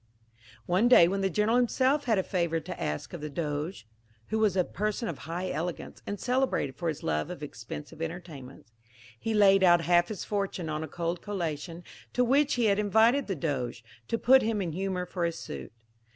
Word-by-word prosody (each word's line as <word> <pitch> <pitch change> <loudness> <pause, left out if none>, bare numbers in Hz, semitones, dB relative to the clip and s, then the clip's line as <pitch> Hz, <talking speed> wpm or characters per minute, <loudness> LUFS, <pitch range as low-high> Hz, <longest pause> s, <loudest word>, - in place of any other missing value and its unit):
One 185 +7 +3
day 245 -9 +8
when 195 +2 -1
the 195 - +1
General 210 +6 +2
himself 260 +4 +2
had 225 -4 +2
a 190 - +2
favour 170 -3 0
to 175 +3 -8
ask 75 0 -3
of 175 - -6
the 150 - -4
Doge 150 +1 -3 0.4
(who 220 - 0
was 210 -4 +2
a 180 - +4
person 215 +6 -2
of 165 - -5
high 180 +2 -2
elegance, 165 +4 -4
and 205 -1 -4
celebrated 250 - 0
for 170 - -4
his 155 -3 -3
love 75 -1 -1
of 175 -4 -7
expensive 145 +4 -8
entertainments), 160 -8 -7 0.5
he 225 -1 -2
laid 195 -2 +6
out 175 -2 +6
half 175 +1 +3
his 210 -4 -5
fortune 195 -5 -2
on 155 0 -2
a - - -5
cold 170 +2 -3
collation, 170 -4 -4 0.3
to 250 - +3
which 280 +4 +3
he 240 -2 +1
had 200 -1 +3
invited 220 +6 +3
the 195 - -1
Doge, 130 -6 -3 0.2
to 230 - 0
put 265 +3 +6
him 220 -2 0
in 180 -4 -2
humour 185 +1 -2
for 180 0 -4
his 170 -1 -1
suit. 65 -2 -7
180 Hz, 200 wpm, -29 LUFS, 160-210 Hz, 0.5 s, day